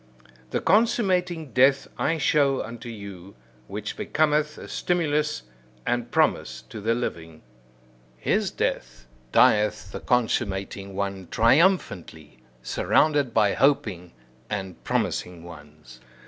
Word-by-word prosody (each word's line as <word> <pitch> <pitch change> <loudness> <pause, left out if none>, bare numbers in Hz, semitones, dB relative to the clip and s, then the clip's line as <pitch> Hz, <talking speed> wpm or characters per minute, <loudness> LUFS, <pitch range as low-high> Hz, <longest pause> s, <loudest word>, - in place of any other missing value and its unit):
The - - -1
consummating 185 - +1
death 135 +2 +4
I 165 - 0
show 140 -2 +2
unto 115 +1 -8
you, 100 -3 -9 0.3
which - - -5
becometh 150 -1 +1
a - - -9
stimulus 150 -4 0 0.4
and 120 0 -1
promise - - +1
to 110 - -8
the 115 +3 +1
living. 80 -9 -5 0.7
His - - 0
death, - - -3 0.3
dieth 105 -2 +3
the - - -5
consummating 100 -5 -1
one 100 -2 -3
triumphantly, 115 - +1 0.2
surrounded 145 - +2
by 105 -3 +3
hoping 110 -12 +1 0.4
and 95 -3 -5
promising 90 -2 -2
ones. 75 -6 -13
115 Hz, 105 wpm, -25 LUFS, 95-150 Hz, 0.7 s, death